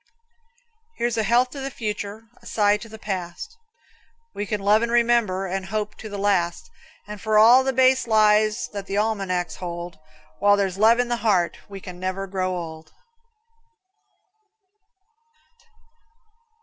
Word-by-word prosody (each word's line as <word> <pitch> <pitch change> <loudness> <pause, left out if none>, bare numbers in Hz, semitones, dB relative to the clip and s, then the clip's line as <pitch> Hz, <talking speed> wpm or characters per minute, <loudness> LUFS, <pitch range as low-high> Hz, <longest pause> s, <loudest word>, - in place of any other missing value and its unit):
Here's 240 -1 -1
a 225 - +1
health 240 +4 +2
to 280 - -8
the 270 0 -4
future, 210 -2 -5 0.2
A - - -14
sigh 205 -1 +2
for 225 - -11
the 220 - -10
past. 190 - -6 0.8
We 205 - -4
can 210 0 -2
love 205 +2 +3
and 235 0 -1
remember, 235 -5 +2
And 190 0 -4
hope 210 +1 -3
to 215 - -8
the 205 - -6
last, 190 -4 0 0.3
And 210 -1 -9
for 215 -1 +1
all 235 +5 +7
the 265 - 0
base 260 -1 +3
lies 215 0 +3
That 200 -1 -7
the 200 - -2
almanacs 195 -5 -1
hold. 175 -2 -7 0.4
While 205 0 +4
there's 195 -1 -1
love 225 +2 +5
in 245 0 0
the 240 - 0
heart, 190 -7 +1
We 195 -1 -8
can 180 -1 -10
never 185 +1 -3
grow 185 -1 -2
old. 160 -2 -8
210 Hz, 150 wpm, -23 LUFS, 190-225 Hz, 0.8 s, all